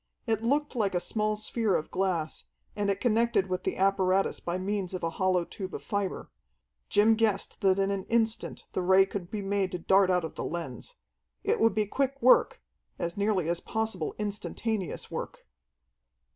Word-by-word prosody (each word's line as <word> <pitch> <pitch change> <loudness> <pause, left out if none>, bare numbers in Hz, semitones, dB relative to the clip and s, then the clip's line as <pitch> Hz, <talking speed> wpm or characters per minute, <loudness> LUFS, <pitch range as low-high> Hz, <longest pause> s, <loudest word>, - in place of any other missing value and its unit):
It 220 -3 0
looked 285 +5 0
like 200 -5 0
a - - +3
small 215 +3 0
sphere 215 -1 0
of 155 - -2
glass, 180 -5 -1 0.3
and 205 -1 0
it 195 - 0
connected 235 -3 +2
with 185 -1 -2
the - - -1
apparatus 195 0 +2
by 175 +1 -3
means 190 -1 -2
of 180 - -6
a 165 - 0
hollow 185 0 +1
tube 190 +1 -7
of - - -7
fibre. 200 -2 -3 0.6
Jim 215 +2 +5
guessed 215 -3 0
that 190 -1 +4
in 195 0 +1
an 195 -1 -3
instant 225 -1 0
the - - -1
Ray 190 +1 +5
could 195 -3 -6
be 210 -2 -4
made 195 -1 0
to - - -1
dart 190 +2 +4
out 180 -2 +2
of 160 - -7
the - - -5
lens. 175 - -5 0.5
It 425 +3 +1
would 225 -3 +3
be 215 -1 +2
quick 275 +5 -1
work 275 - +4 0.3
as 170 -1 -3
nearly 200 -4 +1
as 170 0 0
possible 220 -7 -3
instantaneous 210 -1 -3
work. - - -6
200 Hz, 185 wpm, -29 LUFS, 185-220 Hz, 0.6 s, Jim